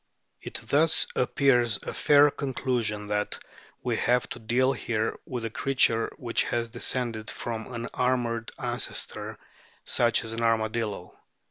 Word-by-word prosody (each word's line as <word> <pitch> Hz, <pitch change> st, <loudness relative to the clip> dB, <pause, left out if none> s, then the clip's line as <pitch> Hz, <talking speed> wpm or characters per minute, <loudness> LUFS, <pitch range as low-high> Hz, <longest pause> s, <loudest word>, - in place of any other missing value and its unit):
It -, -, -8 dB
thus 155 Hz, +3 st, +4 dB
appears 125 Hz, -4 st, +3 dB
a -, -, -5 dB
fair 145 Hz, 0 st, +5 dB
conclusion 120 Hz, -7 st, -2 dB
that 105 Hz, 0 st, -1 dB, 0.5 s
we -, -, 0 dB
have 125 Hz, 0 st, +2 dB
to -, -, -6 dB
deal 125 Hz, +4 st, +2 dB
here 115 Hz, -3 st, -2 dB
with 125 Hz, -3 st, -4 dB
a 115 Hz, -, -3 dB
creature 115 Hz, -3 st, +2 dB
which 120 Hz, -2 st, +1 dB
has 120 Hz, -1 st, -1 dB
descended 120 Hz, -2 st, -2 dB
from 115 Hz, 0 st, -5 dB
an 120 Hz, -1 st, -4 dB
armoured 120 Hz, -2 st, 0 dB
ancestor, -, -, -3 dB, 0.5 s
such 120 Hz, -1 st, +3 dB
as 110 Hz, -, -6 dB
an 115 Hz, +1 st, -4 dB
armadillo. 110 Hz, -1 st, -1 dB
120 Hz, 135 wpm, -27 LUFS, 115-125 Hz, 0.5 s, fair